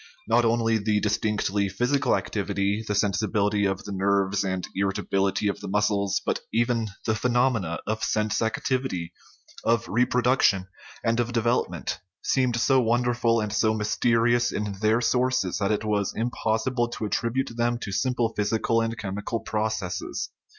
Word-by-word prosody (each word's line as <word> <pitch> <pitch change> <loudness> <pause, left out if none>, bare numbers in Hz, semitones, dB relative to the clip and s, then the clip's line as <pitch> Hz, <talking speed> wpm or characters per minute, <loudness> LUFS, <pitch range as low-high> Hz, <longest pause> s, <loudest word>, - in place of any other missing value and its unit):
Not 115 +1 +3
only 115 -1 +2
the 105 0 +1
distinctly 105 -1 0
psychical 125 +9 +1
activ - - -2
ity, 100 +2 0
the 105 - -1
sensibility 105 +1 +1
of 95 0 -1
the 105 - -7
nerves 100 0 +1
and 95 -2 -2
the - - -7
irritability 95 0 0
of 100 - -1
the - - -7
muscles, 100 0 +1
but - - 0
even 115 0 +1 0.2
the 110 - +2
phenomena 120 -7 +1
of 110 0 -2
sense 105 -1 0
activity, 120 - -1 0.5
of 115 0 +1
reproduction, 125 -5 +2 0.4
and 115 +1 +1
of 120 0 -1
development 120 -4 0 0.2
seemed 130 -3 +1
so 130 +2 +4
won 120 +1 +2
derful 120 -1 +2
and 105 -1 -2
so 110 0 +2
mysterious 115 +2 +2
in 105 0 -2
their 110 +2 +3
sources 125 -7 +1
that 100 0 +1
it 105 0 -1
was 105 -2 0
im 115 +2 0
possible 120 +3 0
to 115 -2 -5
attribute 115 +5 -1
them 120 0 +1
to 105 - -6
simple 120 +2 0
physical 110 +2 +1
and 115 0 -2
chem 100 -3 -4
ical 115 +2 -4
processes. 110 -4 -3
110 Hz, 160 wpm, -26 LUFS, 100-120 Hz, 0.5 s, so